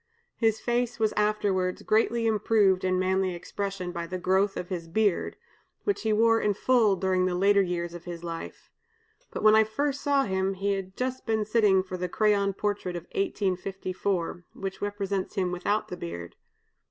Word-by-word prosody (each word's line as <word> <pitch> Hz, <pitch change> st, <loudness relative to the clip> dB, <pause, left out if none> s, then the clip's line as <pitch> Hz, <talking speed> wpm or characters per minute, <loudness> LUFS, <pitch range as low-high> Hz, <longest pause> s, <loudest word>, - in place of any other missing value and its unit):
His 225 Hz, -2 st, +1 dB
face 240 Hz, 0 st, -1 dB
was 220 Hz, -1 st, +1 dB
afterwards 205 Hz, -3 st, 0 dB
greatly 230 Hz, +1 st, +2 dB
improved 210 Hz, -3 st, +3 dB
in 185 Hz, 0 st, +1 dB
manly 185 Hz, 0 st, +1 dB
expression 195 Hz, +1 st, -4 dB
by 170 Hz, -1 st, -5 dB
the 185 Hz, +2 st, -4 dB
growth 190 Hz, +2 st, +1 dB
of 175 Hz, -, -5 dB
his 170 Hz, -3 st, -4 dB
beard, 205 Hz, +2 st, +1 dB, 0.5 s
which 405 Hz, -, 0 dB
he 220 Hz, -, 0 dB
wore 225 Hz, +1 st, +4 dB
in 205 Hz, -1 st, +1 dB
full 225 Hz, -3 st, +3 dB
during 185 Hz, 0 st, +1 dB
the 180 Hz, -, -1 dB
later 200 Hz, +2 st, +4 dB
years 175 Hz, -2 st, -2 dB
of 175 Hz, -1 st, -9 dB
his 170 Hz, -1 st, -7 dB
life; 165 Hz, -1 st, -7 dB, 0.6 s
but -, -, -6 dB
when 215 Hz, 0 st, +7 dB
I 220 Hz, 0 st, +7 dB
first 280 Hz, +6 st, -2 dB
saw 280 Hz, -2 st, +2 dB
him 190 Hz, -1 st, -1 dB
he 200 Hz, +2 st, -1 dB
had 190 Hz, -1 st, -5 dB
just 255 Hz, 0 st, -3 dB
been 220 Hz, -1 st, +1 dB
sitting 210 Hz, -3 st, +3 dB
for 185 Hz, -1 st, -6 dB
the 180 Hz, 0 st, -3 dB
crayon 200 Hz, 0 st, +2 dB
portrait 205 Hz, -3 st, -2 dB
of 170 Hz, -, -5 dB
1854, 190 Hz, -, -2 dB
which 195 Hz, 0 st, -6 dB
represents 200 Hz, -1 st, -3 dB
him 185 Hz, -3 st, 0 dB
without 200 Hz, +4 st, -1 dB
the 180 Hz, -, -5 dB
beard. 85 Hz, -, -7 dB
195 Hz, 175 wpm, -27 LUFS, 185-215 Hz, 0.6 s, when